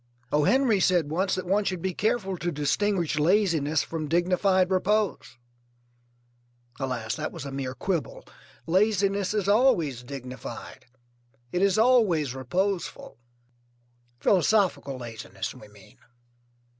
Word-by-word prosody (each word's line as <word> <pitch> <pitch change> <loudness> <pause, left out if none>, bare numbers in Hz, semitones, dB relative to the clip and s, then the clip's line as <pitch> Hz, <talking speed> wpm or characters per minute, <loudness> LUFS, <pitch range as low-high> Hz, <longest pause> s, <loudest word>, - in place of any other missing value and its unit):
O. 150 0 +2
Henry 255 - +3
said 175 -5 +2
once 190 +4 0
that 185 - -4
one 200 +4 +1
should 185 -2 -2
be 185 +2 -2
careful 210 -2 -1
to 175 0 -3
distinguish 170 +2 0
laziness 160 -4 +2
from 160 -2 -5
dignified 185 +3 +2
repose. 200 - 0 1.4
Alas, 125 -5 -3
that - - -4
was - - -8
a 140 - -6
mere 135 -1 -4
quibble. 175 -1 -3 0.4
Laziness 200 +2 +1
is 205 -3 0
always 200 - +3
dignified, 130 -1 -9 0.6
it 180 - -1
is 195 0 +3
always 215 - +3
reposeful. 180 +9 -3 1.0
Philosophical 190 -7 +2
laziness, 110 -5 -6
we 115 -5 -14
mean. 105 -2 -19
180 Hz, 120 wpm, -26 LUFS, 140-200 Hz, 1.4 s, Henry